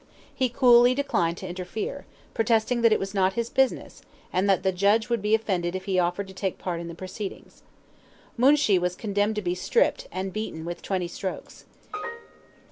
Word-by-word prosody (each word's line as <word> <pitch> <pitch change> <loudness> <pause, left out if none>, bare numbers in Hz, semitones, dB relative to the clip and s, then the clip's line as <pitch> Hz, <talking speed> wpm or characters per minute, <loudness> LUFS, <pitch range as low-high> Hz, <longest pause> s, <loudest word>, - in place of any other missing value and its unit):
He 260 -1 0
coolly 245 0 +5
declined 175 -12 0
to 190 - -7
interfere, 185 - -5 0.3
protesting 230 +1 +1
that 230 -1 +5
it 215 - +5
was 195 +1 -5
not 190 -1 +2
his 235 0 -3
business, 265 -1 0 0.3
and 190 +2 +1
that 190 -1 +3
the 190 - +2
judge 205 +5 +2
would 235 -3 0
be 210 +2 +3
offended 185 -5 -1
if 185 0 -5
he 190 -2 +1
offered 180 +3 0
to - - -10
take 190 0 -3
part 175 -2 -3
in 170 - -6
the 170 - -7
proceedings. 190 +3 -8 0.7
Moonshee 255 -6 +4
was 180 0 -1
condemned 205 +1 0
to 210 - -3
be 175 -1 0
stripped, 185 - +1
and 190 0 -4
beaten 210 -7 -5
with 175 0 -5
twenty 185 -3 -2
strokes. 185 0 -7
195 Hz, 185 wpm, -26 LUFS, 180-230 Hz, 0.7 s, coolly